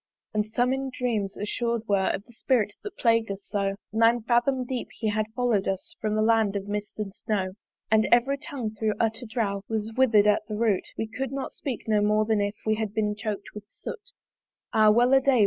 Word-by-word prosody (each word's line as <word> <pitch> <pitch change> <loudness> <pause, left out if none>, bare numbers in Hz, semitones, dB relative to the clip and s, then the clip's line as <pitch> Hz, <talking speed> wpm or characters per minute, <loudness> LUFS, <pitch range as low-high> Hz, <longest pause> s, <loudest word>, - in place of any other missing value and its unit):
And 210 0 0
some 245 +4 +1
in 270 0 -2
dreams 230 -6 -2
assured 235 +2 -1
were 195 -2 +2
Of 200 - -2
the 240 - -18
Spirit 225 -3 +1
that 415 - -8
plagued 230 -2 +3
us 195 0 -4
so: 195 -1 -1 0.2
Nine 230 +1 +4
fathom 250 +2 +2
deep 250 -1 -3
he 220 - 0
had 215 0 0
follow'd 240 -6 +1
us 190 -1 -3
From 215 -1 0
the 215 - +2
Land 220 -2 +3
of 200 0 -3
Mist 205 0 -4
and 205 -3 -4
Snow. 205 -5 -2 0.4
And 220 0 +4
every 270 +4 +4
tongue 245 -7 -4
thro' 220 0 0
utter 225 +2 0
drouth 215 -4 -1
Was 220 0 -2
wither'd 225 -6 +5
at 210 0 +4
the 215 - -4
root; 215 -3 +1
We 225 - -1
could 240 +4 -4
not 275 -1 -4
speak 255 -6 -5
no 215 -1 +3
more 210 +1 +3
than 215 -1 +2
if 205 +1 -1
We 215 - +3
had 215 -2 -3
been 210 -1 +1
choked 205 -2 -4
with 210 -1 -9
soot. 460 - -8 0.6
Ah 215 -1 +6
wel 240 +4 +5
a 270 - +6
day! 265 -2 +3
220 Hz, 215 wpm, -26 LUFS, 210-240 Hz, 0.6 s, Ah